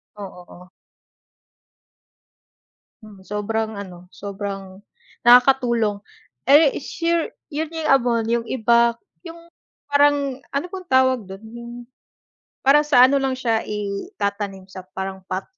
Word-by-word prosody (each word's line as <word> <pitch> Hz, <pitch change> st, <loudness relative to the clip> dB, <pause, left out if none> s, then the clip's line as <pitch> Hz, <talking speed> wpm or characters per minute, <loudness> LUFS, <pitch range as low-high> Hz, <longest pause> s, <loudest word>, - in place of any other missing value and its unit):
Oo, 195 Hz, -3 st, -10 dB
o. 180 Hz, +1 st, -15 dB, 2.4 s
Mm, 210 Hz, -2 st, -14 dB
sobrang 220 Hz, +1 st, -2 dB
ano, 180 Hz, -3 st, -9 dB
sobrang 195 Hz, -1 st, -7 dB, 0.5 s
nakakatulong. 240 Hz, -4 st, +4 dB, 0.5 s
Eh, 290 Hz, +1 st, +6 dB
is -, -, -8 dB
sure 335 Hz, -1 st, -1 dB, 0.2 s
'yun 310 Hz, +2 st, -2 dB
'yung 320 Hz, -1 st, -3 dB
abono, 240 Hz, -4 st, +3 dB
'yung 235 Hz, 0 st, 0 dB
iba 235 Hz, -1 st, +3 dB, 0.3 s
'yung 335 Hz, 0 st, -11 dB, 0.4 s
parang 285 Hz, -2 st, +2 dB
ano 280 Hz, +4 st, -1 dB
pong 370 Hz, -2 st, -8 dB
tawag 260 Hz, -2 st, +3 dB
do'n 195 Hz, +2 st, -10 dB
'yung, 235 Hz, 0 st, -9 dB, 0.9 s
parang 285 Hz, +3 st, +5 dB
sa 250 Hz, -4 st, +6 dB
ano 280 Hz, -, +1 dB
lang 270 Hz, -1 st, 0 dB
siya 230 Hz, -4 st, -1 dB
itatanim 200 Hz, -1 st, -4 dB
sa 185 Hz, -1 st, -9 dB
parang 190 Hz, 0 st, -5 dB
pot. 185 Hz, +1 st, -3 dB
235 Hz, 120 wpm, -21 LUFS, 200-275 Hz, 2.4 s, Eh